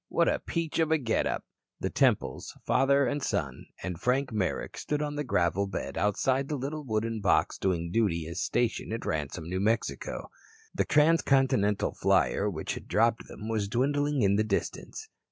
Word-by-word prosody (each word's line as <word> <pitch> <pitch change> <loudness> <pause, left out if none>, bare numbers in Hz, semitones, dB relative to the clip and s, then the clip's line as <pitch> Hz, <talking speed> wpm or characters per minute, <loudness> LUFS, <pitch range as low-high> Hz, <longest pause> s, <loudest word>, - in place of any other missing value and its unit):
What - - +2
a - - +2
peach 165 -1 -3
of 160 -1 +3
a 160 - +5
get 120 -6 0
up." - - -2 0.4
The - - -2
Temples, - - +1
father 140 +2 +3
and 145 +3 -1
son, 75 - -2 0.2
and 90 -3 -4
Frank 130 +1 +1
Merrick 105 -5 -2
stood 150 - -2
on 145 0 -2
the 150 - -1
gravel 95 - +1
bed 95 - -5
outside 130 +6 +1
the 150 - -2
little 145 +4 -4
wooden 110 -2 -2
box 95 -4 +2
doing 85 -3 -1
duty 90 -7 +1
as 85 +2 -4
station 120 -2 0
at 115 - -4
Ransome, 80 +2 -3
New 90 +2 -2
Mexico. 115 - -1 0.4
The - - +1
transcontinental 135 -9 +3
flier 105 - +2
which 80 -6 -3
had - - -8
dropped 115 +1 +2
them, 110 - -8
was 110 -3 -1
dwindling 145 +4 +1
in 100 0 +3
the 110 - +3
distance. 110 -2 -3
115 Hz, 175 wpm, -29 LUFS, 100-140 Hz, 0.4 s, a